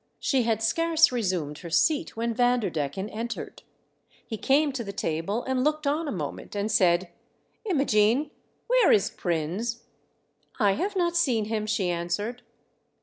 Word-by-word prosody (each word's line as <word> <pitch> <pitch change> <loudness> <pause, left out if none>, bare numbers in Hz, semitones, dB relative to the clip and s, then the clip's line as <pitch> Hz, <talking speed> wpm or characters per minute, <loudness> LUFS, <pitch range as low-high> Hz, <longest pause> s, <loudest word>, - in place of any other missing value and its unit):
She 265 -3 +1
had 225 -2 0
scarce 330 +7 +3
resumed 180 -11 -2
her 170 - -8
seat 310 - +1
when 230 +1 -1
Vanderdecken 200 - 0
entered. 230 +2 -5 0.6
He 220 - -5
came 285 +6 +2
to 260 -3 -4
the 200 - -6
table 195 +5 -2
and 260 -1 0
looked 305 +1 0
on 300 +3 0
a - - -2
moment, 155 +1 -6
and 205 +2 -1
said: 180 -4 +3 0.3
" - - -43
Imogene, 275 - +2 0.3
where - - +4
is 210 +2 +3
Prins 200 +4 -2 0.2
?" - - -45
" - - -42
I 205 -3 +4
have 390 - -2
not 345 -2 +1
seen 250 -11 +2
him," 215 0 -2
she 195 -4 0
answered. 205 +8 -3
225 Hz, 160 wpm, -26 LUFS, 195-280 Hz, 0.6 s, where